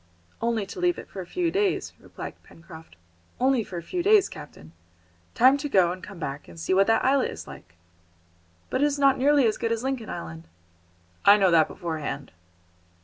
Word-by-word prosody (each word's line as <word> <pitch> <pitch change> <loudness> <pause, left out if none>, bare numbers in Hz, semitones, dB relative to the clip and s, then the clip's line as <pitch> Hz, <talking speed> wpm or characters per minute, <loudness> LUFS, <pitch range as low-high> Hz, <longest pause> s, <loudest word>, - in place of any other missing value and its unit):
"Only 230 -3 0
to 195 - -9
leave 355 -1 +1
it - - -10
for 190 - -6
a 175 - -10
few 345 - -1
days," 400 0 0
replied - - -9
Pencroft, 160 - -15 0.4
"only 260 -2 +2
for 185 - -8
a 170 - -6
few 355 - -3
days, 405 +1 +4
captain. 150 - -12 0.6
Time 260 +3 +5
to 290 +1 -4
go 185 -7 +4
and 185 +1 -8
come 200 - -10
back, 145 -3 -6
and 165 - -12
see 165 - -1
what 195 +1 +4
that 225 0 +2
islet 270 0 +3
is - - -8
like!" 85 0 -13 1.0
"But 260 - 0
it - - +5
is 290 -1 0
not 275 -2 +3
nearly 285 0 +4
as 220 - 0
good 230 -1 -1
as 230 +1 -1
Lincoln 260 -4 -3
Island." 80 0 -7 0.8
"I 200 +1 +7
know 190 -3 +3
that 160 -2 +5
beforehand." 155 -6 -5
220 Hz, 200 wpm, -25 LUFS, 165-275 Hz, 1.0 s, I